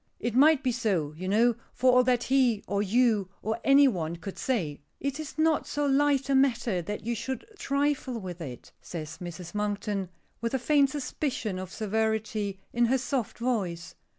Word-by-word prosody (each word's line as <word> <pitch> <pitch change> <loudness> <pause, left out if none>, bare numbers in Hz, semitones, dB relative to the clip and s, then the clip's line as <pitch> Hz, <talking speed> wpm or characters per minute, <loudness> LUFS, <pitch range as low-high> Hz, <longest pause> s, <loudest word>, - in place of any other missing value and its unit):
It 240 -1 -2
might 290 +3 +5
be 255 - +2
so, 195 -11 0
you 185 +4 -5
know, 230 +5 +4 0.2
for 255 0 +4
all 250 0 +6
that 245 -1 +2
he, 250 -5 +2
or 200 0 0
you, 210 -2 +2
or 220 +2 -1
any 275 +1 +6
one 170 -8 -1
could 190 +3 -8
say." 170 - -1 0.2
"It 280 +1 -3
is 310 -1 -7
not 315 -1 +2
so 290 0 -1
light 280 -1 +3
a 275 - +1
matter 245 -8 +2
that 205 +5 -5
you 235 - 0
should 265 - -4
trifle 280 -3 0
with 180 -3 -7
it," 125 -6 -8
says 160 -1 -7
Mrs. 175 0 -7
Monkton, 205 -2 -2 0.3
with 235 +2 -1
a - - +3
faint 280 +2 +3
suspicion 265 -7 -3
of 185 -1 -7
severity 220 -2 -1
in 240 0 +3
her 260 +3 +3
soft 255 -3 -2
voice. 200 -9 -2
230 Hz, 180 wpm, -28 LUFS, 190-265 Hz, 0.3 s, all